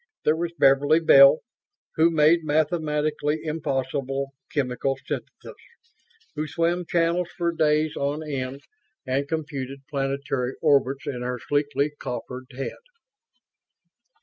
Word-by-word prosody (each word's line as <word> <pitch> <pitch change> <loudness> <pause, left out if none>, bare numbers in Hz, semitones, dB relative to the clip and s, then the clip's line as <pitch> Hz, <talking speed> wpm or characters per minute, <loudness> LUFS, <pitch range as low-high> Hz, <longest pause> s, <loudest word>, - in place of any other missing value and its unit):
There 155 - +3
was 170 +1 -2
Beverly 140 +4 +4
Bell, 140 -2 +7 0.5
who 160 +1 +4
made 160 +1 +4
mathematically 155 -1 0
impossible 135 -3 -2 0.2
chemical 135 -1 -1
syntheses - - -6 0.8
who 155 0 -3
swam 170 +2 -1
channels 170 +1 +1
for 170 -2 +1
days 155 -1 +1
on 145 +3 -2
end 135 -1 -4 0.4
and 135 +2 -1
computed 140 -4 -4
planetary 135 -2 -2
orbits 140 -3 +2
in 125 -3 -4
her 125 0 -3
sleekly 145 +2 0
coiffured 125 0 -6
head. 135 +2 -6
145 Hz, 110 wpm, -25 LUFS, 135-155 Hz, 0.8 s, Bell